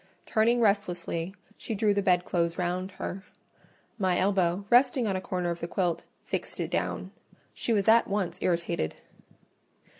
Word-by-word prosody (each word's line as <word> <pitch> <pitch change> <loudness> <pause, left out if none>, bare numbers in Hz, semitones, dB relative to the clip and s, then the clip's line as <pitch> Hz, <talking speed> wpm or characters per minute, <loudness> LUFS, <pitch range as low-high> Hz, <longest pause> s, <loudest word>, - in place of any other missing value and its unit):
Turning 230 +2 +3
restlessly, 190 -4 0 0.2
she 225 - -4
drew 210 0 +3
the 200 - +1
bedclothes 175 -3 +1
round 180 +1 -1
her; 190 0 -5 0.8
my 185 -2 +2
elbow, 190 -1 +1
resting 250 0 +5
on 195 -3 0
a 185 - -2
corner 180 -2 -2
of 170 - -4
the 170 - -4
quilt, 175 -1 -1 0.2
fixed - - -4
it - - -2
down: - - -2 0.4
she - - -3
was 205 -3 +2
at 230 +1 +6
once 200 -3 -2
irritated. 170 - 0
190 Hz, 150 wpm, -28 LUFS, 175-205 Hz, 0.8 s, at